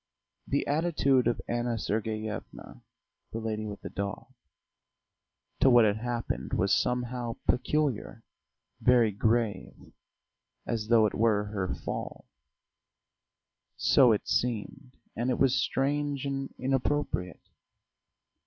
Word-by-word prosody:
The 140 - 0
attitude 145 -5 +2
of 120 - 0
Anna 120 0 -1
Sergeyevna 110 0 -4 0.5
"the - - -4
lady 110 -1 -3
with 105 -1 -7
the - - -6
dog" 100 +6 -5 1.3
to 135 - +5
what 120 -3 +7
had 105 0 +2
happened 115 - -3
was 100 +1 +2
somehow 125 -1 -1
peculiar, 130 -4 0 0.6
very 120 -3 +4
grave, 110 0 -1 0.7
as 110 -2 -2
though 115 -1 +5
it 105 - 0
were 110 -2 +2
her 95 -3 -2
fall - - -6 1.5
so 125 -3 +5
it 105 - 0
seemed, 125 +2 -2 0.2
and 120 +3 -1
it 125 - +1
was 135 -2 +3
strange 140 +1 0
and 135 -1 -3
inappropriate. 130 - -1
120 Hz, 110 wpm, -29 LUFS, 110-130 Hz, 1.5 s, what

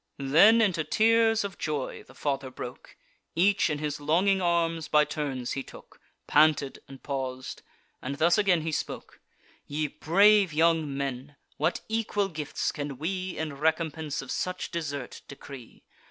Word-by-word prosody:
Then 165 +12 +5
into 185 -7 +2
tears 225 +3 +3
of 200 -2 -6
joy 150 -4 -3
the - - -18
father 140 -2 -2
broke; 125 -1 -9 0.4
Each 190 +2 +3
in 150 - -1
his 150 -1 -3
longing 185 +6 +2
arms 165 -2 0
by 150 0 +4
turns 135 -6 -4
he 135 - -2
took; - - -14 0.2
Panted 150 -2 +3
and 135 -1 -13
paus'd; 130 -2 -5 0.4
and 140 +2 -4
thus 170 +4 +3
again 195 -5 +3
he 160 +1 -3
spoke: - - -5 0.5
"Ye 150 +1 -2
brave 190 +5 +4
young 160 -3 +2
men, 140 +1 -4 0.2
what 155 +4 0
equal 215 -3 -1
gifts 155 -4 -3
can 145 -2 -5
we, 185 +4 -3
In 155 -2 -3
recompense 160 0 -1
of - - -8
such 185 0 -3
desert, 145 -6 -5
decree? 135 -3 -11
155 Hz, 150 wpm, -27 LUFS, 140-180 Hz, 0.5 s, Then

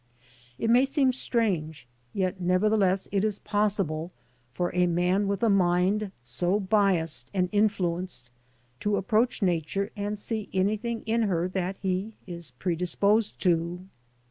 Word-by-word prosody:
It 225 - 0
may 245 +2 +6
seem 270 -1 +2
strange, 180 - -1 0.2
yet 185 +2 -2
nevertheless 190 +1 +2
it 200 0 +1
is 215 -2 0
possible, 195 -6 -1 0.4
for 175 +7 -2
a 180 0 +3
man 180 +4 +1
with 200 +2 -2
a - - +5
mind 190 +2 +2
so 175 - 0
biassed 190 -5 +1
and 180 -1 +1
influenced 185 - 0 0.5
to 205 -1 0
approach 220 +4 +1
Nature 185 +4 -1
and 205 0 -3
see 215 0 -3
anything 215 +5 -1
in 225 +1 +1
her 175 -1 0
that 185 0 -2
he 190 +3 -2
is 170 -4 -6
predisposed 180 - +1
to. 175 0 0
190 Hz, 135 wpm, -27 LUFS, 175-210 Hz, 0.5 s, may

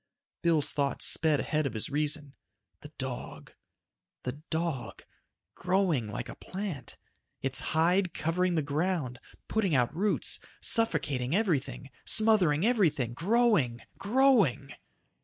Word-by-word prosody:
Bill's 160 -4 +2
thoughts 140 -1 0
sped 155 -3 +4
ahead 155 -2 0
of 120 - -7
his 110 - -3
reason. 150 -1 -1 0.5
The - - -12
dog. - - -6 0.7
The 125 - -2 0.2
dog... 160 -5 -3 0.5
growing 180 - 0
like 105 - -5
a - - -7
plant. 185 - -6 0.5
Its 135 0 -1
hide 175 +6 +1
covering 175 +2 0
the 155 - +1
ground, 145 -3 -2 0.3
putting 200 -8 +1
out 125 +3 +1
roots, 200 +4 0 0.2
suffocating 150 - +2
everything, 150 - -1
smothering 200 -7 +3
everything, 155 - +1
growing, 170 - +2 0.2
growing. 205 - +3
160 Hz, 115 wpm, -29 LUFS, 140-190 Hz, 0.7 s, sped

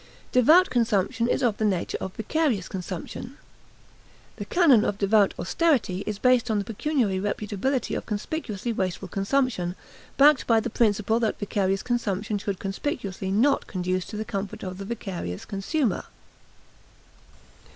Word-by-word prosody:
Devout 315 +9 +5
consumption 230 -1 +1
is 265 - 0
of 230 -4 +2
the - - -2
nature 195 -5 0
of 190 - -5
vicarious 260 0 0
consumption. 190 - -6 1.0
This - - -6
canon 295 - +5
of 200 - -1
devout 205 0 +3
austerity 225 - +1
is 210 -2 -2
based 250 +1 +3
on 215 - +1
the 200 - -1
pecuniary 225 -4 0
reputability 210 +5 -1
of - - -5
conspicuously 225 0 -3
wasteful 190 -2 -2
consumption, 195 -2 0 0.4
backed 285 0 +5
by 230 -1 +5
the 225 +1 -4
principle 215 0 +2
that 225 -2 0
vicarious 195 -1 -1
consumption 210 -3 -1
should 200 -1 -3
conspicuously 195 -2 -4
not 255 +8 +2
conduce 185 -1 -2
to 210 - -7
the 215 - -3
comfort 195 -1 -5
of 185 0 -6
the 195 - -5
vicarious 185 - -5
consumer. 210 - -1
210 Hz, 140 wpm, -25 LUFS, 195-245 Hz, 1.0 s, Devout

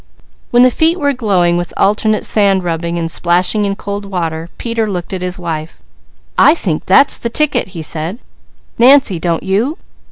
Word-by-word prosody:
When 240 +1 +4
the 255 - +5
feet 325 +7 +1
were 285 -2 +1
glowing 185 -8 +1
with 175 0 -5
alternate 215 +1 +1
sand 200 -3 +2
rubbing 170 0 -3
and 165 -1 -3
splashing 180 +5 +1
in 200 0 -2
cold 200 +1 -6
water, 165 -4 -4
Peter 230 -2 -2
looked 180 0 -5
at 185 - -4
his 180 0 -4
wife. 165 -3 -5 0.6
"I 300 - +6
think 170 - -3
that's 275 +9 +4
the 235 - -3
ticket!" 235 - 0
he 160 - -5
said. 160 +6 -4 0.6
"Nancy, 245 -7 +5
don't 170 0 -2
you? 215 - -1
195 Hz, 170 wpm, -14 LUFS, 170-230 Hz, 0.6 s, I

